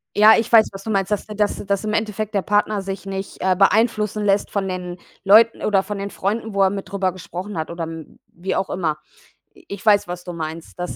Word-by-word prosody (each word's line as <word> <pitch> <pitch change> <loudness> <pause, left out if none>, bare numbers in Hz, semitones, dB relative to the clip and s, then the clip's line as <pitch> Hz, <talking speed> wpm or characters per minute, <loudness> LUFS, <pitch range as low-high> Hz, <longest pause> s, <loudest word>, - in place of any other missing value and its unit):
Ja, 215 +2 +8
ich 225 - -1
weiß, 225 -2 +6
was 195 0 -10
du 220 - -6
meinst, 195 -1 0
dass 210 - -1
dass 210 -1 -1
dass 200 +1 -1
im 215 0 -2
Endeffekt 215 -1 -2
der 200 - +1
Partner 205 +1 +1
sich 195 0 -6
nicht, 195 0 -5
äh, 185 -1 +2
beeinflussen 210 +1 +2
lässt 200 0 +2
von 200 -2 -2
den 180 -1 -5 0.3
Leuten 220 +4 +5
oder 195 -2 +2
von 205 0 -5
den 200 - -4
Freunden, 210 +2 -3
wo 195 - +4
er 190 - +3
mit 195 -1 -6
drüber 195 -2 0
gesprochen 185 +1 -7
hat 160 - -3
oder 170 0 -5
m 165 -1 -8
wie 185 +2 -3
auch 190 - -1
immer. 160 -4 -1 0.6
I 370 - -20
ich 200 +2 -8
weiß, 205 -3 +4
was 175 0 -6
du 175 - -7
meinst. 160 +1 -7
Das 180 - -4
195 Hz, 235 wpm, -21 LUFS, 185-210 Hz, 0.6 s, Ja